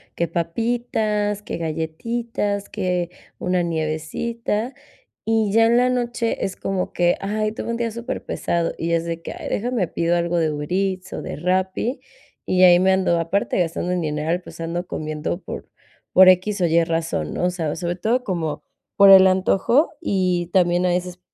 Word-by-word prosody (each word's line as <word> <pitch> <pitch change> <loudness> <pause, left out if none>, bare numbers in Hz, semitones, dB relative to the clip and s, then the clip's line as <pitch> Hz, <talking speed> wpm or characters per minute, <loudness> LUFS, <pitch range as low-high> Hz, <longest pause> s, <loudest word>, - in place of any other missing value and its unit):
que 170 - 0
papitas, 210 +3 -1
que - - -5
galletitas, 200 +6 -3
que 180 -2 -2 0.3
una 180 -1 0
nievecita, 170 - -2 0.5
y 220 -2 +1
ya 225 0 +5
en 235 +1 +4
la 250 +1 +4
noche 240 -2 -1
es 190 - -3
como 190 -2 -2
que: 175 0 +2
"Ay, 215 +2 -1
tuve - - -5
un 235 - -1
día 235 -1 -1
superpesado", 220 -7 -2
y 170 +1 -2
es 165 0 +1
de 165 0 -4
que: - - -7
"Ay, - - -7
déjame 230 -4 -1
pido 170 +1 0
algo 170 0 0
de 160 -2 +1
Uber 150 0 -4
Eats 190 -1 -1
o - - -4
de - - -6
Rappi", 185 - -1 0.4
y 185 0 +3
ahí 175 0 +7
me 190 0 +4
ando 185 -2 +2
aparte 170 +4 0
gastando 175 +1 -1
el 180 - -1
dineral, 155 +3 -1
pues 175 - -13
ando 170 +2 -3
comiendo 155 +3 -4
por - - -8 0.4
por 185 0 +8
equis 185 +2 +2
o 175 - +4
ye 165 +1 +3
razón, 165 0 -2
¿no?, 180 - -1
o - - +3
sea, 165 -4 -3
sobre 175 +1 -3
todo 235 +7 0
como 160 - -3 0.4
por 200 -1 +8
el 190 -1 +10
antojo 190 - +3
y 180 - 0
también 175 -1 +3
a 180 - +3
veces, 180 0 -2
185 Hz, 180 wpm, -22 LUFS, 170-210 Hz, 0.5 s, el